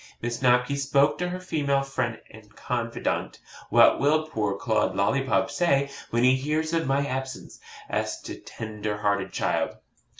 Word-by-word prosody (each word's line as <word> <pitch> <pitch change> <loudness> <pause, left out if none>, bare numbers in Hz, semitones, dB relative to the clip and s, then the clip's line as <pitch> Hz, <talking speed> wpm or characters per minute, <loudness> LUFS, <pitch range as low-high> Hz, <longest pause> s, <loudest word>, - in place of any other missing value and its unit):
Miss 120 0 -3
Snobky 125 +1 +3
spoke 140 +1 +2
to 180 0 -1
her 180 +1 -4
female 145 -6 0
friend 130 -4 -2
and 105 -2 -16
confidante. 115 -2 -2 0.3
'What - - +6
will 155 +3 +3
poor 105 -9 -1
Claude - - 0
Lollipop - - +1
say 140 -5 +2 0.2
when 120 +1 +1
he 130 +1 +6
hears 155 +4 -1
of 165 -3 +1
my 140 +1 +1
absence?' 130 -1 -5 0.3
asked - - -3
the - - -6
tender 105 -1 -5
hearted 100 -2 0
child. - - -1
135 Hz, 155 wpm, -26 LUFS, 115-145 Hz, 0.3 s, What